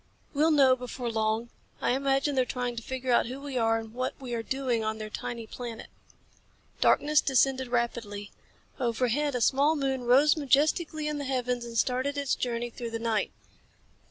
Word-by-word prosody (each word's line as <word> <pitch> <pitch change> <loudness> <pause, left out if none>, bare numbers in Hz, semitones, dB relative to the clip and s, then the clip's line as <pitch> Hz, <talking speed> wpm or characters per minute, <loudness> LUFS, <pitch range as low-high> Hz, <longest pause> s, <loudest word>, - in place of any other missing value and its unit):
"We'll 305 +3 +3
know 275 -4 +5
before 250 -1 -5
long. 220 +1 -1 0.3
I - - +1
imagine 275 +2 +1
they're 260 -1 +3
trying 250 -1 -3
to 235 - -4
figure 260 +1 -3
out 235 - +4
who 255 +3 -6
we 280 -1 -7
are 225 -2 +2
and 225 -1 -7
what 255 +1 -2
we 255 -3 -6
are 230 - -1
doing 250 -2 -1
on 220 0 -2
their 215 -1 -7
tiny 230 +1 -5
planet." 235 0 -7 0.9
Darkness 300 +1 +4
descended 265 -1 +2
rapidly. 230 -4 -2 0.5
Overhead, 250 +4 0
a 245 - -1
small 285 +6 +3
moon 265 -3 -1
rose 275 +5 +5
majestically 305 +2 +1
in 300 -1 -2
the 285 - -4
heavens 250 -2 -1
and 230 -1 -6
started 260 +4 0
its 280 -1 0
journey 240 -1 -2
through 235 0 -6
the 230 - -3
night. 225 -2 -1
250 Hz, 180 wpm, -28 LUFS, 235-275 Hz, 0.9 s, know